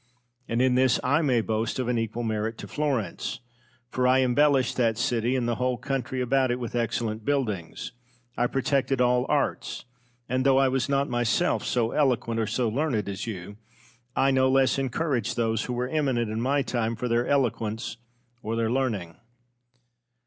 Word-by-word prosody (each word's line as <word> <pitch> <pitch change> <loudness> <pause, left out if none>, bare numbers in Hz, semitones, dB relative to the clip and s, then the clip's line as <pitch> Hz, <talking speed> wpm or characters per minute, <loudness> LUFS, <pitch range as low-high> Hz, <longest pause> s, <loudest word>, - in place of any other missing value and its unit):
And 115 +2 +1
in 130 -1 +3
this 130 0 +3
I 145 +5 +3
may 130 -7 +2
boast 110 +2 -2
of 130 -2 -2
an 120 -1 +1
equal 115 +1 -3
merit 110 0 -2
to - - -8
Florence. 135 - -2 0.5
For 125 0 +1
I 130 +1 +5
embellished 135 0 +3
that 115 -3 +2
city 120 +1 0
and 125 -2 0
the 120 - -1
whole 125 0 0
country 130 0 -3
about 130 +1 +2
it 120 +1 -1
with 120 -1 -5
excellent 115 -2 -1
buildings; 110 - -2 0.4
I 120 - +1
protected 135 0 0
all 125 0 +3
arts; - - -1 0.4
and, 130 +1 0
though 135 -1 +4
I 135 -1 +4
was 130 0 -1
not 140 0 +1
myself 120 +8 +1
so 115 -2 0
eloquent 120 -5 +1
or 110 - 0
so 115 +3 0
learned 115 -3 -1
as 100 +2 -4
you, 100 -1 -6 0.6
I 135 0 +3
no 130 0 +3
less 135 0 +3
encouraged 135 -3 -1
those 115 -1 0
who 125 - -3
were 125 +1 -1
eminent 130 -7 0
in 110 +1 -2
my 140 +3 +1
time 115 -2 -1
for 125 +2 -3
their 120 +1 +1
eloquence 115 -5 -1 0.4
or 110 0 -3
their 115 0 0
learning. 110 -10 -1
125 Hz, 180 wpm, -26 LUFS, 115-130 Hz, 0.6 s, I